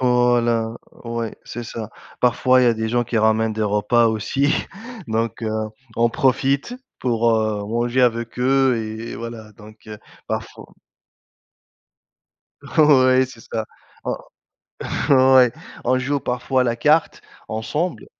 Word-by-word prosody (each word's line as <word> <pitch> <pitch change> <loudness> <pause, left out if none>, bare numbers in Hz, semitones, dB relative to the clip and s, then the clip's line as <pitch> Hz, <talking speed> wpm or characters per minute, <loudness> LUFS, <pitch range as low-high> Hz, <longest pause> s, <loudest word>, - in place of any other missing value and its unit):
Voilà, 120 -2 +2 0.3
ouais, 115 -2 -4
c'est 120 +1 -7
ça. 110 -1 -7 0.3
Parfois 125 +1 +3
il - - +4
y - - +4
a 120 - +4
des 110 0 -2
gens 120 +1 +1
qui 115 0 -1
ramènent 110 +1 +2
des 110 0 -2
repas 105 +3 +2
aussi 135 +6 0 0.6
donc 115 +1 -2
heu, 110 - -1 0.5
on 120 0 +3
profite 135 - +1 0.3
pour, 115 -2 +1
heu, 110 -1 0
manger 120 +3 0
avec 115 0 0
eux 130 0 +3
et 110 +1 -5
et - - -6
voilà 115 -2 -8
donc 110 -1 -15
heu, 105 - -8 0.3
parfo - - -6 1.9
Ouais 130 -4 +4
c'est 125 -3 -14
ça. 110 -1 -4 1.3
On 130 -1 +4
ouais, 125 -2 +6 0.3
on 130 +1 +2
joue 140 +2 -1
parfois 125 +1 0
la 120 -1 0
carte 150 +6 +2 0.3
ensemble, 150 +11 -3
120 Hz, 135 wpm, -21 LUFS, 110-130 Hz, 1.9 s, ouais